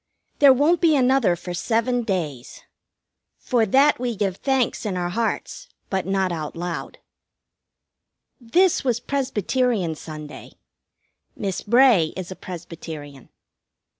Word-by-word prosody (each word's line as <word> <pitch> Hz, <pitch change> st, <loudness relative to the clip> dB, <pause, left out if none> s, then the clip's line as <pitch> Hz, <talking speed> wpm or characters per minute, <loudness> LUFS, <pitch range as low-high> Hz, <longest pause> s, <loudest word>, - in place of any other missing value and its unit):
There 280 Hz, -2 st, +8 dB
won't 295 Hz, +6 st, +3 dB
be 325 Hz, -3 st, +4 dB
another 260 Hz, -8 st, +3 dB
for 175 Hz, +1 st, -7 dB
seven 230 Hz, +6 st, 0 dB
days. 160 Hz, -, -4 dB, 0.7 s
For 235 Hz, -3 st, 0 dB
that 275 Hz, +7 st, +4 dB
we 245 Hz, -2 st, -2 dB
give 195 Hz, -2 st, -1 dB
thanks 265 Hz, -3 st, 0 dB
in 200 Hz, -4 st, -2 dB
our 175 Hz, -1 st, -2 dB
hearts, 230 Hz, -, -3 dB, 0.2 s
but 190 Hz, -1 st, -1 dB
not 195 Hz, -1 st, 0 dB
out 155 Hz, -3 st, -5 dB
loud. 165 Hz, -5 st, -5 dB, 1.4 s
This 340 Hz, +10 st, +2 dB
was 245 Hz, -3 st, 0 dB
Presbyterian 250 Hz, -7 st, -1 dB
Sunday. 155 Hz, -1 st, -10 dB, 0.8 s
Miss 195 Hz, -3 st, -3 dB
Bray 230 Hz, -8 st, +4 dB
is 185 Hz, -1 st, -6 dB
a -, -, -6 dB
Presbyterian. 160 Hz, -6 st, -9 dB
205 Hz, 120 wpm, -23 LUFS, 175-255 Hz, 1.4 s, There